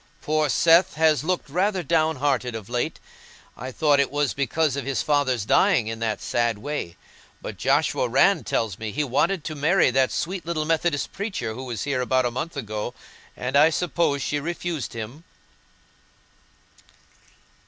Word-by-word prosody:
Poor 155 -1 0
Seth 165 +5 +4
has 155 -1 +3
looked 180 0 -1
rather 185 +5 0
down 160 0 +2
hearted 130 -3 0
of 110 -2 -7
late; 120 0 -2 0.6
I 130 +2 -7
thought 145 +1 +3
it 140 - +2
was 145 -2 0
because 140 +1 0
of 140 - -3
his 135 +1 -1
father's 130 -7 +1
dying 175 - +3
in 115 +1 -5
that 110 -2 -2
sad 120 -2 0
way, 105 - -5 0.4
but - - -7
Joshua - - +1
Rann - - +4
tells 105 -5 -2
me 110 -1 -4
he 150 +7 -1
wanted 150 +6 0
to 155 - -4
marry 155 +1 +3
that 130 0 +2
sweet 175 +2 -3
little 165 -2 -2
Methodist 160 -2 0
preacher 195 - -3
who 130 +3 -7
was 120 -5 -4
here 140 -3 -1
about 130 0 +1
a 120 - 0
month 145 +6 -5
ago, 110 -1 -4 0.4
and 125 +2 -3
I 150 +3 +7
suppose 165 -4 0
she 145 - -1
refused 170 -2 -4
him." 115 +7 -7
145 Hz, 165 wpm, -24 LUFS, 125-160 Hz, 0.6 s, I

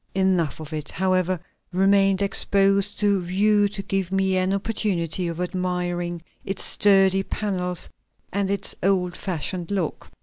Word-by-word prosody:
Enough 185 -7 +1
of 155 0 -8
it, 150 -1 -4
however, 185 -1 0 0.3
remained 195 +1 +3
exposed 200 0 +2
to 200 -2 +2
view 205 +4 +2
to 200 -1 -5
give 195 -2 -2
me 190 -1 +1
an 185 0 +1
opportunity 195 -4 -1
of 170 0 -5
admiring 175 -1 -2 0.2
its 195 - -2
sturdy 195 -1 +4
panels 180 -3 -3 0.5
and 200 0 0
its 200 -1 -1
old 180 -2 +1
fashioned 175 -1 -3
lock. 190 -6 -3
190 Hz, 135 wpm, -24 LUFS, 180-195 Hz, 0.5 s, sturdy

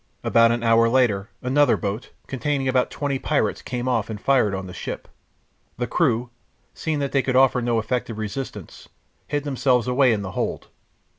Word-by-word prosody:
About 115 0 +4
an 120 0 -1
hour 115 0 +4
later 115 -5 +2
another 135 +1 +3
boat, 105 +3 -4 0.2
containing 135 +1 -2
about 130 -1 +2
twenty 140 -2 -2
pirates, 140 -9 0
came 125 0 -4
off 115 -5 0
and 110 -2 -5
fired 115 -6 +2
on 95 0 -5
the 90 - -9
ship. - - -6 0.7
The - - -1
crew, 120 +2 0 0.4
seeing 160 -2 -2
that 140 -1 -2
they 135 - +3
could 130 0 -1
offer 130 -2 +4
no 120 -1 0
effective 115 0 -2
resistance, 110 +5 -6 0.4
hid 145 -1 -2
themselves 130 -3 +1
away 125 0 +4
in 105 -3 -1
the 95 - -5
hold. - - -3
125 Hz, 175 wpm, -23 LUFS, 115-135 Hz, 0.7 s, About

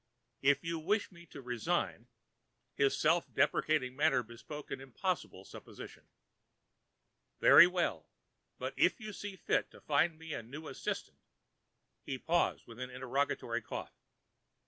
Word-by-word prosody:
If 140 +1 +3
you 165 0 -2
wish 205 +7 0
me 170 -1 -15
to 140 -2 -11
resign"—his 125 +3 -3
self 165 +2 +2
deprecatory 140 -1 +2
manner 145 -1 +2
bespoke 120 +6 -9
an - - -4
impossible 135 - -3
supposition—"very 170 - 0
well. 180 -1 -1 0.5
But, - - -4
if - - +3
you 215 -2 -7
see 205 0 -6
fit 185 - 0
to - - -15
find 155 +2 +2
me 160 -1 -7
a - - -3
new 140 +7 -9
assistant——" - - -4 0.8
He 135 - -4
paused, 170 +6 +1
with 115 0 -12
an 125 0 -4
interrogatory 125 -2 -1
cough. - - -6
150 Hz, 125 wpm, -33 LUFS, 125-170 Hz, 0.8 s, If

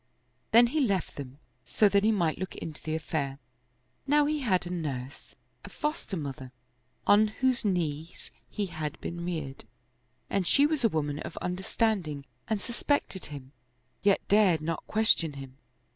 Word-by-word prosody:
Then 235 +2 +7
he 285 +7 0
left 200 - 0
them, 135 -1 -8 0.3
so 215 - +3
he 200 +2 +4
might 170 -7 +1
look 185 -1 -4
into 155 -2 -7
the 155 0 -2
affair. 150 -3 -2 0.7
Now 295 +1 +4
he 300 +1 0
had 190 -10 +1
a 175 - -5
nurse, 145 -6 -5 0.3
a - - -9
foster 300 - -3
mother, 135 -4 -6 0.5
on 210 +1 +6
whose 255 +3 +1
knees 165 -4 -2 0.2
he 210 - -2
had 155 -4 -5
been 170 0 -5
reared, 155 -7 -4 0.6
and 190 -3 0
she 285 - +5
was 300 -3 0
a 230 - +5
woman 150 -4 -1
of - - -7
understanding 180 -5 -1 0.2
and 220 -2 0
suspected 240 -3 -1
him, 140 -3 -9 0.5
yet 200 -1 +2
dared 195 -6 +4
not 165 +1 -3
question 210 -8 +3
him. 135 -1 -10
180 Hz, 155 wpm, -29 LUFS, 150-215 Hz, 0.7 s, Then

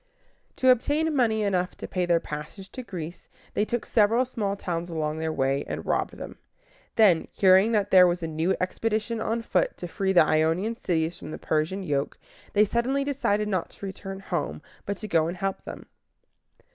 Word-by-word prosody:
To 260 - +3
obtain 295 +6 +2
money 220 -5 +2
enough 185 -2 0
to - - -6
pay 180 -1 -1
their 170 -1 +4
passage 155 +6 -8
to 255 - -6
Greece, 175 -7 -8 0.2
they 210 - +1
took 240 +1 -2
several 225 +3 +3
small 210 -6 -2
towns 175 -3 -4
along 155 -1 -2
their 160 0 -1
way, 135 -1 0
and - - -5
robbed - - -1
them. - - -9 0.6
Then, 200 -8 +5
hearing 190 +3 +5
that 205 -2 +1
there 185 -1 +8
was 175 0 -1
a - - -1
new 160 +4 0
expedition 220 +4 -1
on 230 +1 -1
foot - - 0
to 175 - -6
free 190 +3 -1
the 175 -4 +6
Ionian 160 +8 +1
cities 165 -6 -1
from - - -8
the - - -5
Persian 160 +6 -1
yoke, 145 -5 -1 0.4
they 210 +1 +5
suddenly 250 +6 0
decided 215 -7 0
not 185 -4 -1
to - - -10
return 195 0 -7
home, 75 - -3 0.2
but 200 -1 -2
to 215 - -6
go 160 -4 +2
and 175 +2 -4
help 195 +1 -3
them. - - -8
190 Hz, 190 wpm, -26 LUFS, 165-220 Hz, 0.6 s, there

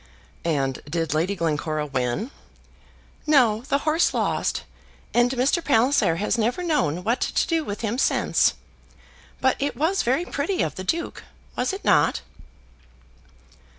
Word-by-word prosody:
"And 135 -4 -1
did 165 -1 -1
Lady 170 +6 0
Glencora 155 -2 -1
win?" 135 - -2 1.0
"No; 245 -8 +4
the 280 - +3
horse 315 +2 +2
lost; - - 0 0.5
and 240 +1 +4
Mr. 265 +7 +1
Palliser 230 - +3
has 210 +6 -1
never 240 +11 0
known 255 - 0
what 230 +5 0
to - - +1
do 330 -2 +1
with 205 -7 -5
him 230 +2 -2
since. - - +2 0.9
But 260 - +2
it 285 +1 -2
was 335 +7 +1
very 265 +9 +1
pretty 340 +6 -1
of - - -2
the 185 - -6
Duke; 335 - -3 0.3
was - - 0
it 390 +1 -7
not?" - - +3
235 Hz, 140 wpm, -24 LUFS, -, 1.0 s, No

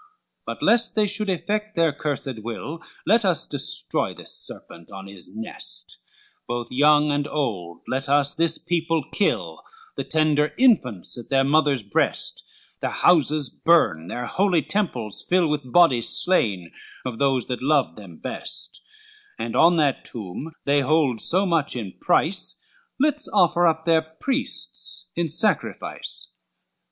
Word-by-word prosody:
LXXXVII 420 0 -34
"But - - -5
lest 235 0 +2
they 215 -1 +3
should 205 0 0
effect 210 +4 -2
their 165 -3 +2
cursed 140 -5 -3
will, 120 +8 -6 0.3
Let 225 +5 +3
us 180 -5 +2
destroy 140 -2 0
this - - -4
serpent 85 0 -3
on 95 0 -9
his 100 -3 -5
nest; 110 0 -3 0.5
Both 120 0 -4
young 150 +3 +4
and 145 0 -1
old, 95 - -4
let 135 +1 -3
us 140 0 +4
this 165 0 +2
people 165 -2 -1
kill, 205 - -1 0.4
The - - -2
tender 150 -1 +1
infants 125 - +2
at 120 - -11
their 135 -1 +3
mothers' 145 -3 +2
breast, 100 - +1 0.4
Their - - -2
houses 155 -4 +2
burn, 85 - +2
their 120 +6 -5
holy 180 +1 +1
temples 125 - -2
fill 180 -2 +3
With 145 -4 -3
bodies 130 -9 +4
slain 100 - +1 0.3
of 125 -3 -5
those 135 -3 +2
that 125 -1 -4
loved 135 - +1
them 95 -6 -12
best, - - -2 0.6
And 115 0 -4
on 170 +1 +5
that 145 -4 +1
tomb 115 - -7
they 140 0 +3
hold 140 -4 +1
so 190 +3 +2
much 165 -7 0
in 105 -6 -5
price, 180 +4 +2 0.4
Let's 295 +1 +1
offer 175 0 +3
up 160 0 0
their 165 -1 +4
priests 160 - -3
in 170 -1 -1
sacrifice." 155 - -1
150 Hz, 145 wpm, -23 LUFS, 120-170 Hz, 0.6 s, on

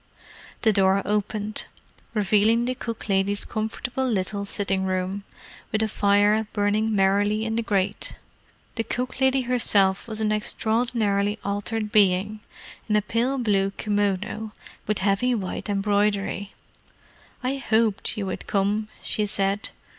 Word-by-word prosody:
The 220 -2 +4
door 195 0 +3
opened, 210 +1 -2 0.5
revealing 215 +3 +3
the 255 - 0
cook 230 -3 -6
lady's 200 0 +1
comfortable 245 +4 -3
little 200 -1 -1
sitting 195 -1 -1
room, 190 +1 -2 0.5
with 215 0 +1
a - - +1
fire 205 +1 +3
burning 210 +1 +1
merrily 205 +2 +2
in 225 0 -1
the 230 - +1
grate. 200 -4 -1 0.6
The 225 - +1
cook 250 +3 -4
lady 265 0 +3
herself 210 -6 +3
was 220 -1 -2
an 215 -1 +1
extraordinarily 215 -1 +1
altered 205 +2 -2
being, 205 0 +3 0.5
in 210 - +3
a 210 - +3
pale 240 +6 0
blue 200 -5 +1
kimono 205 +1 -1 0.3
with 215 0 +1
heavy 210 +5 +2
white 200 0 -4
embroidery. 200 0 0 0.9
"I 265 +2 -1
hoped 220 -4 0
you 205 - -2
would 190 - -5
come," 205 +2 0 0.2
she 210 -1 0
said. 200 +1 -1
210 Hz, 130 wpm, -24 LUFS, 200-220 Hz, 0.9 s, The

